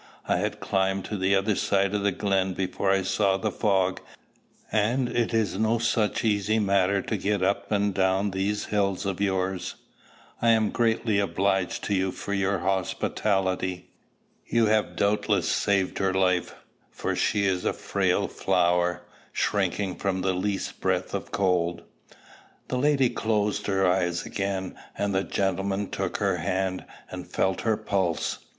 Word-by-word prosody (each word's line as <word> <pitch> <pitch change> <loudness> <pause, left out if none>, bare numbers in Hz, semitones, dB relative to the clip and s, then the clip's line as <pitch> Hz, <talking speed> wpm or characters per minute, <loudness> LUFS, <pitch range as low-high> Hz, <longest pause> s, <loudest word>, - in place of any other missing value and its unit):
I - - +2
had - - -2
climbed 95 0 0
the 100 -1 +2
other 100 +2 +1
side 100 +1 +1
of 105 - 0
the 100 0 +2
glen 95 -2 0
before 95 +1 -1
I 95 0 +3
saw 95 0 +2
the 95 - -2
fog; 95 -3 +1 0.7
and 120 +4 +1
it 120 -1 0
is 110 -4 0
no 110 +1 +2
such 115 -2 0
easy 105 0 +2
matter 100 -2 +2
to 110 - -2
get 100 0 0
up 100 +1 0
and 100 -1 +1
down 95 +1 +1
these 100 +2 -1
hills 100 -2 +1
of 100 -1 -2
yours. 95 -2 -1 0.7
I 115 - +3
am 110 -2 +2
greatly 115 -2 +1
obliged 95 0 0
to 100 - -1
you 95 -1 +1
for 100 - -5
your 100 0 +1
hospitality. 95 0 -1 0.6
You 115 -1 +3
have 110 0 +1
doubtless 105 +1 +1
saved 100 -2 +1
her 95 -1 +1
life; 90 -2 +1 0.3
for - - -3
she 100 -1 +1
is 95 -2 0
a - - +1
frail - - 0
flower, 90 -1 +1 0.3
shrinking 95 -1 -1
from 95 -2 -1
the 95 0 +1
least 95 +2 -2
breath - - 0
of - - -4
cold." 90 -3 0 0.9
The 130 - -1
lady 135 -2 +3
closed 105 -2 0
her 95 -1 +2
eyes 90 -1 +1
again, 95 -2 -3 0.2
and 100 -1 -1
the 95 0 +1
gentleman 95 +1 -1
took - - -2
her - - +1
hand, 95 0 -2 0.3
and - - -7
felt 95 0 0
her 110 -2 +1
pulse. 95 -5 -1
95 Hz, 155 wpm, -26 LUFS, 95-105 Hz, 0.9 s, I